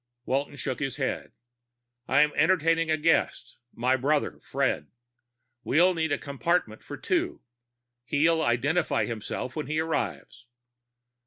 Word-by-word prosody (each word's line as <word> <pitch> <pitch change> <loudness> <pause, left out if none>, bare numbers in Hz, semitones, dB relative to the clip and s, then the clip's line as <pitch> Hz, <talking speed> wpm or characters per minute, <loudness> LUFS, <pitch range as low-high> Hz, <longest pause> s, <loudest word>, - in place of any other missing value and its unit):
Walton 140 +2 -1
shook 130 -2 -4
his 135 -4 -2
head. - - -3 0.8
"I'm 150 +3 +4
entertaining 165 -1 +2
a 155 - +2
guest 165 +2 0
my 125 +3 +1
brother, 140 +3 0
Fred. 75 - -1 0.8
We'll 180 +4 +4
need 160 -3 -1
a 145 - +2
compartment 140 -5 -1
for 145 - -8
two. 355 0 -1 0.6
He'll 160 +5 +2
identify 145 +4 +1
himself 115 +2 -5
when 155 -3 -3
he 155 +1 -1
arrives." 160 -5 -3
150 Hz, 125 wpm, -27 LUFS, 130-165 Hz, 0.8 s, I'm